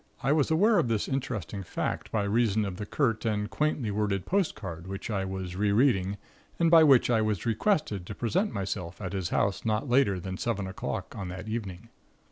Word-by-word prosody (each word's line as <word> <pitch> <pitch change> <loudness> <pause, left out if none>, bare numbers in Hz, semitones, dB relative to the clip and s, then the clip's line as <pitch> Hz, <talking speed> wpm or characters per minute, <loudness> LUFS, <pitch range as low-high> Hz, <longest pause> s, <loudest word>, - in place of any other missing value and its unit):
I 135 - +2
was 150 -2 +3
aware 200 +6 +4
of 155 - +1
this 110 -3 0
interesting 120 -8 -3
fact 90 - -3
by 105 - +1
reason 110 0 +2
of 95 -2 -5
the 105 0 -5
curt 120 -7 0
and 105 -2 0
quaintly 150 -7 0
worded 100 -2 -1
postcard 110 - -2
which 95 +3 -5
I 95 -2 -1
was 95 -1 -5
rereading, 100 -1 +2 0.4
and 165 -1 +3
by 165 -1 +8
which 135 -5 +5
I 115 -2 +3
was 105 -5 -1
requested 115 - 0
to 105 - -6
present 185 - 0
myself 95 -3 -4
at 95 -2 -5
his 95 -3 -2
house 100 -1 0
not 110 +5 0
later 120 -7 +3
than 95 +1 -5
seven 105 -5 -1
o'clock 95 +1 -5
on 95 - -5
that 90 +3 -7
evening. 110 -1 -5
105 Hz, 195 wpm, -28 LUFS, 95-125 Hz, 0.4 s, by